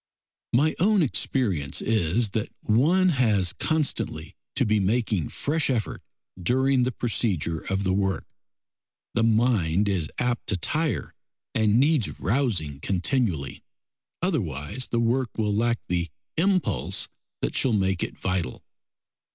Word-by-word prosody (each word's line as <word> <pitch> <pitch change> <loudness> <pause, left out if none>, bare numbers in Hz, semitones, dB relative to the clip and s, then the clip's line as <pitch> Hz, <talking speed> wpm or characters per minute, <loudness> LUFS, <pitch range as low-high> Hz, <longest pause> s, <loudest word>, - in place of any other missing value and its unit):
My 150 +6 +3
own 200 +1 +4
experience 100 - 0
is 110 +1 +1
that 110 0 -2
one 165 - +3
has 110 - +2
constantly 155 -3 -1 0.2
to 130 -1 +2
be 105 -1 +2
making 105 -3 0
fresh 155 +1 -1
effort 120 -5 -1 0.4
during 130 +6 +2
the 125 +1 +1
procedure 95 - -1
of 95 +3 -2
the 95 -1 +1
work. 95 -2 0 0.9
The 115 - +1
mind 110 -5 +2
is 90 -6 0
apt 125 -1 -1
to 100 - 0
tire 145 - -1 0.4
and 110 +1 +3
needs 145 -5 +2
rousing 100 - 0
continually, 90 - -1 0.6
otherwise 110 - -1
the 120 - 0
work 120 +1 0
will 105 -2 +1
lack 115 +3 +1
the 85 -1 -1 0.3
impulse 185 +1 +1 0.4
that - - -1
shall 130 - +2
make 95 -3 +1
it - - -3
vital. 95 -8 -2
110 Hz, 125 wpm, -25 LUFS, 95-130 Hz, 0.9 s, own